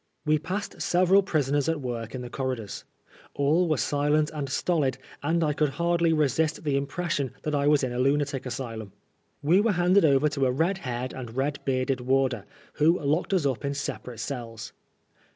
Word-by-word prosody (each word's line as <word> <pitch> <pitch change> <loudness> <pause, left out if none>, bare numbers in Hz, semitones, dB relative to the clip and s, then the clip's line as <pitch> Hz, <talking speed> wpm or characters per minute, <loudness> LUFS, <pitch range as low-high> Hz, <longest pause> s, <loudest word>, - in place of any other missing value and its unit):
We 155 0 +3
passed 190 +6 -5
several 185 +2 +4
prisoners 145 -5 0
at 165 -2 0
work 120 -3 -5
in 125 - -5
the 120 - -7
corridors. 130 -6 -4 0.5
All 155 +6 +2
were 155 - +2
silent 150 +4 +1
and 145 -3 -4
stolid, 135 -3 0 0.2
and 165 +3 +1
I 150 -1 +1
could 150 0 +1
hardly 170 0 +2
resist 155 +1 +1
the 145 -3 0
impres 145 +5 -2
sion 140 -4 -1
that 150 - -2
I 145 0 +1
was 150 -2 +4
in 125 -2 -1
a 120 - -3
lunatic 140 0 +1
asylum; 115 -5 -5 0.5
We 175 +7 +5
were 220 -1 +2
handed 180 +3 +4
over 145 -1 +4
to 140 -3 0
a - - +2
red 170 +9 0
haired 125 -4 -4
and 120 -3 -7
red 140 +1 0
bearded 130 -1 0
warder, 130 -3 +1 0.3
who 165 +4 +3
locked 150 +6 0
us 185 -6 +2
up 130 -5 -1
in 140 0 -2
separate 125 -4 -5
cells. 115 -5 -6
145 Hz, 190 wpm, -27 LUFS, 130-160 Hz, 0.5 s, We